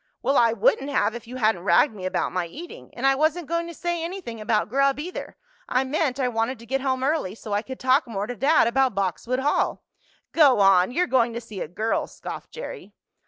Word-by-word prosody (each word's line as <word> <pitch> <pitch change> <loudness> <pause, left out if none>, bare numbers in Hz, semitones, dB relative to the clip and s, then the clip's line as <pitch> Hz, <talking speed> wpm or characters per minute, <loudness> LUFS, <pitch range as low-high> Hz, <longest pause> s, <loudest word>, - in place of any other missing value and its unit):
"Well, 275 - +2
I 235 -3 +5
wouldn't 235 +5 +1
have 215 -6 +1
if 235 -1 -8
you 250 - -8
hadn't 220 -7 +1
ragged 225 +6 +4
me 185 -3 -5
about - - -1
my 180 -1 -2
eating. 330 - -10
And 245 - -3
I 270 - +5
wasn't 310 +4 0
going 335 +2 -2
to 340 - -7
say 345 0 -2
anything 335 - -6
about 215 0 +1
grub, 275 +4 +2
either. 355 +5 -6 0.3
I 255 +1 +2
meant 270 -1 -1
I 255 - +1
wanted 230 +2 -1
to 230 - -13
get 265 +3 -1
home 260 -1 -1
early 270 - 0
so 215 -2 -7
I 205 - +1
could 260 +3 -9
talk 260 +2 +3
more 205 -3 -3
to 245 +3 -5
dad 285 +7 +4
about 255 -1 +2
Boxwood 200 +7 -1
Hall." 290 +2 0 0.5
"Go 285 -8 +5
on! 195 -2 +5
You're 350 +9 +1
going 240 -6 +2
to 235 - -3
see 220 -5 -9
a - - -3
girl!" 215 +7 -1
scoffed - - -8
Jerry. - - -8
255 Hz, 225 wpm, -24 LUFS, 220-280 Hz, 0.5 s, I